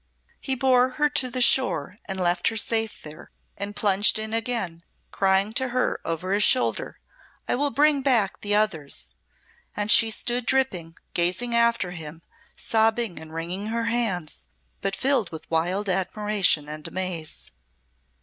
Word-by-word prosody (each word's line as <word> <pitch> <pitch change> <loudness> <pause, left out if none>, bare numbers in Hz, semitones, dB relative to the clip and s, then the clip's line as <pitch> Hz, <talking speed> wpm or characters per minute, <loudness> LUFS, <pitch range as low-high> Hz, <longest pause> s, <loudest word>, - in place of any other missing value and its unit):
He 265 - -1
bore 255 0 +3
her 295 -1 +2
to 255 -3 +1
the 255 +1 -3
shore 185 - +3
and 190 -1 -4
left 175 -1 +1
her 225 - 0
safe 225 -1 0
there, 155 +1 -11 0.3
and 205 +1 -6
plunged 205 +1 +3
in 220 0 -4
again, 225 -8 -3 0.3
crying 195 +2 +1
to 260 +2 0
her, 255 +1 -1
over 165 +3 -3
his 200 +1 +2
shoulder: 255 +4 +2 0.5
"I - - 0
will 285 +3 0
bring 290 0 +2
back 240 -8 +1
the 205 0 0
others!" 170 -10 -1 0.6
And 205 0 +1
she 225 - +7
stood 240 +2 -1
dripping, 185 -12 -1 0.2
gazing 185 +8 +1
after 235 -5 +2
him, 165 -1 -9 0.3
sobbing 225 -3 +1
and 160 0 -10
wringing 175 +5 -4
her 230 +1 -2
hands, 190 -10 -3 0.3
but 195 0 -1
filled 260 -8 +1
with 160 -1 -10
wild 180 +5 0
admiration 190 -4 +1
and 155 0 -7
amaze. 180 -4 -5
205 Hz, 150 wpm, -24 LUFS, 175-240 Hz, 0.6 s, she